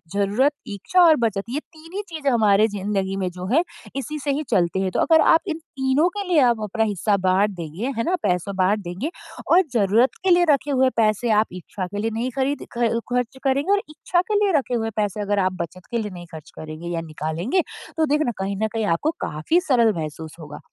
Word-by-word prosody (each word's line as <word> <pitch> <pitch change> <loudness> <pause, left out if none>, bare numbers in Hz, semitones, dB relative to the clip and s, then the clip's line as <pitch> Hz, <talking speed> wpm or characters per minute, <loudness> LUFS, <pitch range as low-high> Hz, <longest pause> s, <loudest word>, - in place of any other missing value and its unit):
ज़रूरत, 205 +8 +2 0.2
इच्छा 215 - +1
और 330 -3 +7
बचत 220 -6 -1
ये 280 +4 -2
3 325 +1 -17
ही 410 - -1
चीज़ें 310 -4 -1
हमारे 215 -2 +4
ज़िंदगी 195 -2 -2
में 185 -2 -1
जो 180 +1 -7
है 325 +5 +4 0.3
इसी 275 +3 -4
से 285 0 -1
ही 290 +3 -1
चलती 180 +1 +1
है। 190 - 0
तो - - -1
अगर 320 -1 +5
आप 325 - +5
इन 320 - -2
तीनों 275 0 0
के 405 - -1
लिए 350 -4 +4
आप 225 -2 0
अपना 215 +2 0
हिस्सा 205 0 +1
बाँट 190 +2 +2
देंगे 175 - -5
है 230 - +1
ना, 360 - +1
पैसा 180 +2 0
बाँट 190 +2 +2
देंगे 190 - -4 0.4
और 360 +2 +7
ज़रूरत 225 +4 +3
के 385 - +2
लिए 350 0 +5
रखे 285 0 +2
हुए 260 -1 +3
पैसे 220 +1 +2
आप 215 - +3
इच्छा 185 +1 -6
के 205 +2 -7
लिए 225 +2 -1
नहीं 230 +3 -2
खरीद 275 +2 -1
ख 235 -1 +1
ख़र्च 250 +1 -1
करेंगे 280 +7 +1
और 405 - +3
इच्छा 325 +3 0
के 420 - +2
लिए 410 -1 +3
रखे 255 -3 -2
हुए 225 -1 -1
पैसे 210 -1 -1
अगर 205 0 0
आप 185 -1 +1
बचत 180 +2 -7
के 235 - 0
लिए 210 -3 -3
नहीं 175 -1 -9
ख़र्च 160 -2 -10
करेंगे 155 +2 -8
या 170 -1 -2
निकालेंगे 165 - -1 0.4
तो 320 - +3
देखना 295 -3 +1
कहीं 195 +1 -2
न - - +3
कहीं 220 -2 -1
आपको 190 - +1
काफ़ी 155 - +1
सरल 235 - +3
महसूस 160 -1 -6
होगा। 150 -2 -9
220 Hz, 225 wpm, -22 LUFS, 190-285 Hz, 0.4 s, और